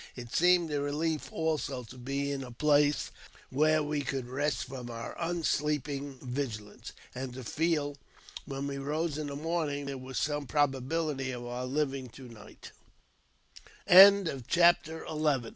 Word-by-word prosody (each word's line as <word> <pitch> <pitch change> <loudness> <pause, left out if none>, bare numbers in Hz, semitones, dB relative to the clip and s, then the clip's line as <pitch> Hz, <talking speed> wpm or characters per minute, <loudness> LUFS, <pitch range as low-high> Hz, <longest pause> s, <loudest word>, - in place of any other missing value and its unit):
It 120 -1 -9
seemed 175 -2 +4
a 145 -1 0
relief, 150 +2 -2
also, 155 -5 -2
to 120 - -12
be 140 +3 -2
in 140 -1 -3
a 125 - -8
place 145 +3 +2 0.4
where 155 +3 +3
we 150 0 -1
could 135 -2 -3
rest 145 +4 -1
from 125 -2 -8
our 115 0 -6
unsleeping 150 -5 -1
vigilance, 125 -5 -5 0.2
and 130 -1 -6
to 130 - -7
feel, 150 +1 0 0.5
when 135 -1 -4
we 140 -1 -4
rose 150 +2 -2
in 150 - -3
the 140 - -5
morning, 150 -2 -2
there 140 -1 -5
was 130 0 -7
some 145 -1 -1
probability 145 0 0
of 120 -1 -5
our 125 +1 -4
140 Hz, 125 wpm, -30 LUFS, 130-150 Hz, 0.5 s, seemed